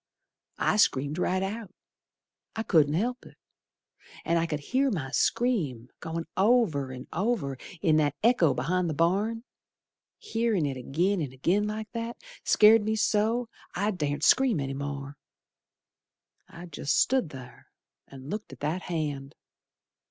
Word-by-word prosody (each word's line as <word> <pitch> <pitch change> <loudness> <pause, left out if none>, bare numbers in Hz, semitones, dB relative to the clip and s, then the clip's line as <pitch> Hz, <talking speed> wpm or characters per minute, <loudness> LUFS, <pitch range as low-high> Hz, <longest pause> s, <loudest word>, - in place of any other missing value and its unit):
I - - +1
screamed 145 -5 +2
right 185 +1 +1
out, 205 0 -5 0.8
I 220 - -2
couldn't 155 -8 +3
help 245 +7 -1
it, - - -16 0.9
An' 170 - +2
I 165 0 +1
could 150 -2 -2
hear 265 - +1
my 150 - -3
scream 150 - 0
Goin' 165 0 -4
over 190 - +2
an' 125 0 -8
over 190 - -1 0.3
In 160 -4 +4
that 145 -2 +1
echo 185 - +4
be'ind 170 +8 0
th' 145 - -6
barn. 205 +7 +1 0.7
Hearin' 225 - 0
it 140 -2 -2
agin 170 +9 0
an' 140 -4 -3
agin 180 +11 +1
like 215 0 -5
that 230 0 -4 0.3
Scared 220 +1 +6
me 220 +1 -1
so, 220 +3 +1 0.3
I 205 +4 +1
dar'sn't 150 -6 -2
scream 255 - +4
any 135 -1 -3
more. 140 0 -5 1.3
I 170 +1 -10
jest 160 -3 -1
stood 260 - +2
ther, 125 -4 -12 0.4
And 135 +2 -10
looked 210 +1 -5
at - - -12
that 155 +5 -1
hand. 145 -6 -4
175 Hz, 145 wpm, -28 LUFS, 145-220 Hz, 1.3 s, Scared